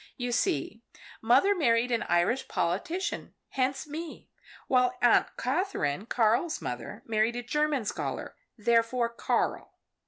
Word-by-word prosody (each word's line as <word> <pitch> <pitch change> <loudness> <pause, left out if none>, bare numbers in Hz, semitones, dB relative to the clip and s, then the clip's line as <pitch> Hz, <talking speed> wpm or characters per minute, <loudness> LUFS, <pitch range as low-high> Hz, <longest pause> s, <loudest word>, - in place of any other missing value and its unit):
You 245 -1 -2
see 215 +1 -1 0.4
mother 260 - +4
married 245 -8 +2
an 235 - +1
Irish 175 +9 +2
politician 265 - -2
hence 270 +2 -1
me. 310 +2 -8 0.4
While 250 -1 +3
Aunt 240 - +5
Katherine 250 - -1
Karl's 240 +8 +1
mother - - -6
married 220 +1 +1
a 245 - -4
German 300 -1 0
scholar - - -4 0.2
therefore 235 +2 +2
Karl. 235 - -2
245 Hz, 120 wpm, -28 LUFS, 225-280 Hz, 0.4 s, Aunt